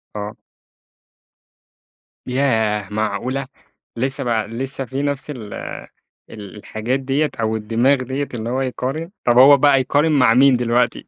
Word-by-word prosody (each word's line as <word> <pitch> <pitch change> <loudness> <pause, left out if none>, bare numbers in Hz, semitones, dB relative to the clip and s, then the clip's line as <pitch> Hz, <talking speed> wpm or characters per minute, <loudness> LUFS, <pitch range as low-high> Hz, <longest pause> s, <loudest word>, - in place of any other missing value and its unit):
آه. 105 0 -5 1.9
ياه 110 -6 0
معقولة! 110 +6 -2 0.5
لسه 135 +2 -1
بقى 115 -4 -1
لسه 135 +3 -5
في 130 +4 -4
نفس 145 0 -3
ال 110 -8 -7 0.8
ال 105 -2 -10
الحاجات 110 +5 -3
دِيَّة 135 +3 0
أو 110 0 0
الدماغ 115 +6 +2
دِيَّة 135 +3 -3
اللي 115 -1 -4
هو 130 +2 -1
يقارن؟ 135 +6 -3
طَب 120 0 +3
هو 140 +3 +8
بقى 140 -1 +4
يقارن 145 +5 +1
مع 125 -6 +4
مين 135 +2 +5
دلوقتي؟ 120 0 0
125 Hz, 135 wpm, -20 LUFS, 110-135 Hz, 1.9 s, هو